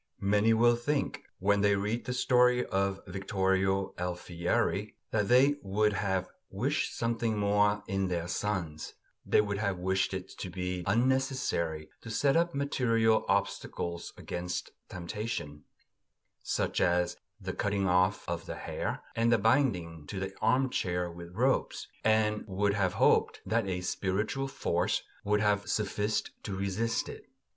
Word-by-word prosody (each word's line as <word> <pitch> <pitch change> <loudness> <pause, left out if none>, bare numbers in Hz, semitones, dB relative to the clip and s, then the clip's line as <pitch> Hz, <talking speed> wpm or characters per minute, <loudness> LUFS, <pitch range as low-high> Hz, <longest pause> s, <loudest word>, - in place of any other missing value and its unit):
Many 105 +3 +3
will 120 +1 +5
think, 140 +5 -1 0.2
when 100 +2 +2
they 100 0 +4
read 105 +4 -2
the 125 - -2
story 125 -1 +4
of 95 0 0
Vittorio 95 0 0
Alfieri, 90 -1 -1 0.2
that 105 -2 +1
they 135 +4 +5
would 105 0 +1
have 95 -2 0 0.2
wished 135 +10 -1
something 115 -1 0
more 105 0 +2
in 95 0 0
their 85 -2 -2
sons; 90 -6 -3 0.3
they - - +4
would 100 -1 -2
have 100 -3 0
wished 95 +1 0
it 95 -1 -5
to 95 - -4
be 90 0 -3
unnecessary 120 - +1
to 115 - -9
set 135 +6 +2
up 170 0 +2
material 115 -5 +2
obstacles 85 0 -1
against 90 +1 -4 0.2
temptation, 85 -5 -5 0.8
such - - -1
as 90 0 +2 0.2
the - - -4
cutting 100 -1 0
off 95 +2 +2
of 85 0 -4
the - - -4
hair - - -4
and 115 +1 +2
the 120 - +5
binding 95 - +1
to 100 - -4
the 95 0 -4
armchair 90 -10 +1
with 85 0 -10
ropes; 130 +5 +1 0.2
and 110 -1 +2
would 100 +1 +1
have 95 -3 +1
hoped - - +3
that 115 -2 +1
a 90 -1 -2
spiritual 105 +9 -1
force 85 -10 0 0.2
would 105 0 +2
have 105 -1 +1
sufficed 105 0 -1
to 100 - -4
resist 100 +4 -1
it. - - -9
100 Hz, 145 wpm, -30 LUFS, 90-115 Hz, 0.8 s, will